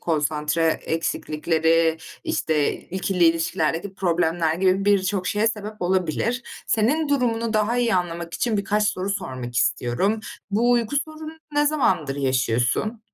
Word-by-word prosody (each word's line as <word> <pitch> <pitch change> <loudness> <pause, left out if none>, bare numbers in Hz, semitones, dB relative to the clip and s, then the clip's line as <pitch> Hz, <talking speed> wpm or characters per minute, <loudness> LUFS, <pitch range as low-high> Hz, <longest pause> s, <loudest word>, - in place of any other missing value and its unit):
konsantre 155 0 0 0.2
eksiklikleri, 160 0 +1 0.3
işte, 155 -2 0
ikili 185 -1 -1
ilişkilerdeki 165 +2 +1
problemler 170 -3 +1
gibi 190 +2 +2
birçok 195 -2 +1
şeye 210 +2 +1
sebep 215 -1 -2
olabilir. 185 +7 0 0.2
Senin 280 +8 +1
durumunu 230 -5 0
daha 215 +3 +1
iyi 235 -4 +2
anlamak 170 -2 -2
için 230 -3 0
birkaç 210 +1 +1
soru 190 -1 -2
sormak 130 -11 -4
istiyorum. 180 - +1 0.3
Bu 230 +4 +2
uyku 240 +2 +1
sorununu 310 0 -10 0.2
ne 295 0 +3
zamandır 185 - +1
yaşıyorsun? 130 - 0
185 Hz, 125 wpm, -23 LUFS, 160-220 Hz, 0.3 s, ne